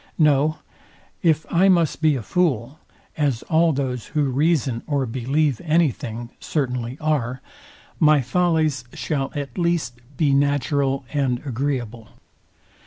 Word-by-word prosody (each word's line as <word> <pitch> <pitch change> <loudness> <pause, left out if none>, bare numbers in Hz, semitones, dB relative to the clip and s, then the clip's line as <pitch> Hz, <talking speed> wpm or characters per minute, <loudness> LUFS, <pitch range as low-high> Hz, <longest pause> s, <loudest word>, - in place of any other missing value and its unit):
No: 150 0 +3 0.6
If 160 -2 +2
I 185 +3 +4
must 170 -4 +2
be 155 -2 +4
a 125 - -4
fool, 140 - 0 0.4
as 140 -7 0
all 165 0 +3
those 130 -4 -3
who 145 -3 +2
reason 135 -4 +1
or 140 -3 0
believe 130 +3 0
any 165 -2 +3
thing 120 -1 -7
certainly 125 -4 -2
are, 135 -5 -1 0.6
my 155 -3 +5
follies 155 -1 +1
shall 135 -3 -2
at 140 +1 -5
least 170 -8 -1 0.2
be 145 -3 +2
natural 140 -1 +1
and 135 -4 +1
agreeable. 120 -4 -3
140 Hz, 125 wpm, -22 LUFS, 125-155 Hz, 0.6 s, my